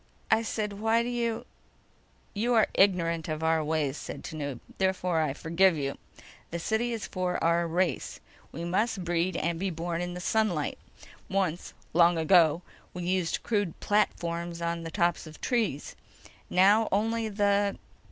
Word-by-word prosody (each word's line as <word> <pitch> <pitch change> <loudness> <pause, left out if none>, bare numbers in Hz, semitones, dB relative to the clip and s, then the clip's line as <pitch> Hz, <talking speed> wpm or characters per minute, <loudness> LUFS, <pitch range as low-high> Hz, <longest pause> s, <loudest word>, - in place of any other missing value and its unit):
"I 220 - +5
said: 215 -2 -3
Why 225 +2 +2
do 240 - -3
you—" 235 -2 -2 0.9
"You 235 +4 +1
are 220 - +6
ignorant 170 -4 +2
of 155 +1 -3
our 160 -1 +2
ways," 150 -2 -1
said - - -7
Tanub. 145 -6 -5 0.2
"Therefore, 185 -3 +1
I 150 -3 0
forgive 170 +3 +2
you. 140 -1 -2 0.5
The 170 - -3
city 220 +7 -1
is 230 -2 -3
for 180 -1 -2
our 170 +1 +2
race. 175 +2 -1 0.3
We 165 +4 -5
must 195 +2 0
breed 175 +1 0
and 170 0 -1
be 195 +1 -1
born 170 0 -3
in 175 0 -4
sunlight. 180 -5 0 0.5
Once—long 175 -2 +1
ago—we 170 +1 +2
used 180 -1 0
crude 205 -7 -1
platforms 170 -4 0
on 170 0 -2
the 165 - -5
tops 175 -2 0
of 155 - -10
the - - -16
trees. 225 - -1 0.5
Now... 205 +4 +4
only 225 +2 0
the 200 -1 +1
180 Hz, 150 wpm, -28 LUFS, 165-205 Hz, 0.9 s, are